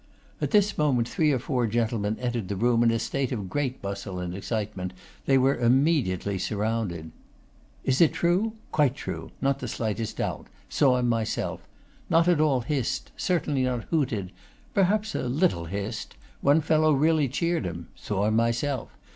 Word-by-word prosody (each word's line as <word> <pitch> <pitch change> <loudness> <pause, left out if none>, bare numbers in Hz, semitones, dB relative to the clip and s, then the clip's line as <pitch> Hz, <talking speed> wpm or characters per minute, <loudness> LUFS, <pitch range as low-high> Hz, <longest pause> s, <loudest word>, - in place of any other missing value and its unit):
At - - 0
this 205 -3 +3
moment 130 -6 +2
three 155 +2 +2
or 135 - +2
four 125 -1 0
gentlemen 110 -1 0
entered 120 -5 -2
the 100 - -3
room 120 +3 +2
in 120 - +5
a 115 - +2
state 135 +3 -2
of 100 -7 -4
great 135 -5 -2
bustle 100 -1 -4
and 90 -1 -4
excitement; 100 -2 -3 0.3
they 135 - +5
were 135 +1 +3
immediately 120 - +2
surrounded. 105 -6 -2 0.7
'Is 130 +3 +2
it 165 - +6
true?' 185 +6 +1 0.2
'Quite 145 -4 +2
true; 80 -7 -6
not 135 0 +1
the 125 - -4
slightest 110 -1 -3
doubt. - - -3 0.2
Saw 130 -3 +3
him 125 -1 +1
myself. 115 -2 -2 0.4
Not 165 +1 +4
at 175 -4 +4
all 140 -5 +3
hissed; 130 0 -2
certainly 155 -7 0
not 125 -3 0
hooted. 120 - 0 0.4
Perhaps 210 +3 +2
a - - -2
little 130 - +1
hissed. 100 +6 -5 0.3
One 145 +3 +4
fellow 155 0 +3
really 155 +1 +3
cheered 170 - -1
him. 85 -1 -6
Saw 100 -1 -2
him 110 +1 +2
myself. 115 +3 0
125 Hz, 165 wpm, -26 LUFS, 105-150 Hz, 0.7 s, it